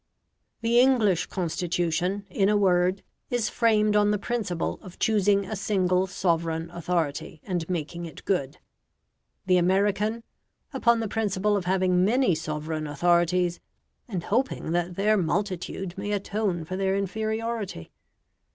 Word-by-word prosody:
The 230 +1 +3
English 235 -9 +3
Constitution, 175 +2 -1
in 195 +2 +2
a 210 - +3
word, 185 -1 +2 0.3
is 240 -3 0
framed 215 -3 +2
on 205 0 +4
the 210 - +2
principle 205 -5 -2
of 185 -4 -12
choosing 205 -2 +2
a 215 - -4
single 190 -2 +1
sovereign 165 -3 -1
authority, 165 -3 -2
and 175 -3 -3
making 170 0 -3
it 160 - -12
good; 140 -9 -1 0.9
the 185 -1 +4
American, 200 +5 +1 0.5
upon 235 -3 +3
the 225 - -2
principle 205 -1 0
of 195 -3 -2
having 185 -1 +2
many 240 +1 +3
sovereign 155 0 -3
authorities, 175 +3 +2 0.5
and 185 -8 -4
hoping 235 -6 -1
that 175 +1 -1
their 210 +3 +3
multitude 185 0 -2
may 205 +1 -3
atone 200 -4 -1
for 185 - -5
their 190 0 0
inferiority. 220 - -3
190 Hz, 135 wpm, -26 LUFS, 175-210 Hz, 0.9 s, on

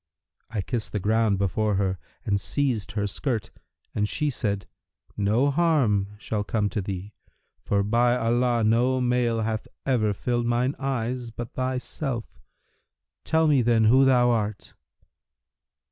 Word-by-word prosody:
I 110 -3 -2
kissed 115 +1 -3
the 105 - 0
ground 110 0 +2
before 100 +2 0
her 95 -2 0 0.3
and 100 -1 +1
seized 115 -4 -1
her 105 -1 -1
skirt; 110 +2 -3 0.4
and 105 0 0
she 150 -1 0
said, 100 -5 -2 0.5
'No 110 +8 +2
harm 125 -11 +2
shall 105 0 -3
come 105 0 0
to 105 - -2
thee; 95 +2 -6 0.5
for, 100 -1 +1
by 120 +4 +3
Allah, 120 0 +1
no 120 +4 +3
male 125 -2 +1
hath 110 0 -2 0.2
ever 115 -6 +2
filled 120 +2 -1
mine 120 +3 +1
eyes[FN#329] 125 -3 -2
but 120 -1 -6
thyself! 130 -1 -3 0.8
Tell 160 0 +2
me, 145 -4 +4
then, 115 -1 +3
who 125 +5 +6
thou 125 -2 +4
art.' 105 -3 -2
115 Hz, 140 wpm, -25 LUFS, 105-125 Hz, 0.8 s, who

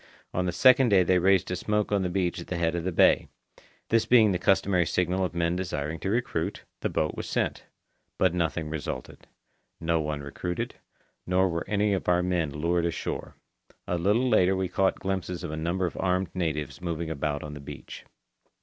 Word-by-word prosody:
On 90 0 0
the - - +1
second 130 +5 +5
day 95 -3 +5
they 90 +1 +3
raised 95 0 +3
a - - 0
smoke 105 +3 -1
on 100 -1 +2
the 90 - -1
beach 90 -1 -1
at - - -10
the 90 - -3
head 85 -1 +1
of 85 -1 -2
the 95 - 0
bay. 85 - +4 0.6
This 115 -1 +2
being 110 -4 +6
the 90 - 0
customary 90 -2 +2
signal 90 +1 0
of 90 -2 -3
men 85 0 +1
desiring 80 -4 -3
to 95 - -3
recruit, 110 -7 -1 0.2
the - - -1
boat 75 - 0
was - - -6
sent. - - -1 0.5
But 95 -2 +3
nothing 85 -2 -1
resulted. 75 -4 -6 0.5
No 80 0 +1
one 75 -1 -3
recruited, 90 +5 -4 0.5
nor 90 +1 +3
were 85 -1 -3
any 105 0 +2
of 95 - -1
our 90 0 +3
men 90 -4 0
lured 85 +4 0
ashore. 85 - -4 0.5
A 90 - -1
little 105 +8 +2
later 95 -5 +4
we 95 -1 -1
caught 95 +2 +2
glimpses 95 -2 -3
of - - -4
a - - -3
number 85 +4 -1
of 90 - -4
armed 90 -1 0
natives 75 -3 -3
moving 85 -2 -3
about 75 -1 -2
on 75 -1 -7
the 75 - -8
beach. 70 - -9
90 Hz, 200 wpm, -27 LUFS, 80-95 Hz, 0.6 s, being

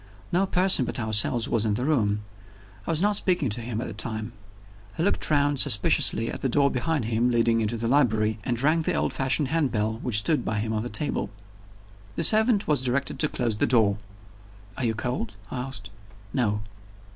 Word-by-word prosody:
No 190 +3 +2
person 185 -6 +3
but 120 - -4
ourselves 110 +1 +1
was 115 - +1
in 105 -2 0
the 125 - -2
room; 105 -9 +1 0.6
I - - -4
was 165 +2 +1
not 210 0 +2
speaking 175 - 0
to 110 +3 -4
him 115 -1 -4
at 125 - -3
the - - -6
time. 110 +1 -5 0.6
He 165 - 0
looked 200 - 0
round 145 -2 +2
suspiciously 110 +2 +3
at - - -7
the 135 - 0
door 140 +2 +3
behind 145 0 -1
him, 115 +2 +1
leading 115 -1 +2
into 110 +2 -1
the 115 +1 -2
library, 110 -5 +2
and 120 +1 -2
rang 155 +5 +2
the - - -1
old - - -1
fashioned 135 +2 0
handbell 115 -9 0
which 120 -4 +1
stood 125 +5 +1
by 110 - -2
him 110 +2 -2
on 110 - -1
the 120 - -5
table. 150 -8 -2 0.9
The - - -1
servant 220 -1 +4
was 145 -4 +1
directed 130 +2 -1
to 150 - +2
close 115 -4 -1
the - - +1
door. 110 -4 +2 0.8
"Are 130 - -2
you 110 -1 0
cold?" 115 -2 -3 0.2
I 130 - -4
asked. 125 -6 -6 0.4
"No." 105 -5 0
120 Hz, 200 wpm, -25 LUFS, 110-145 Hz, 0.9 s, servant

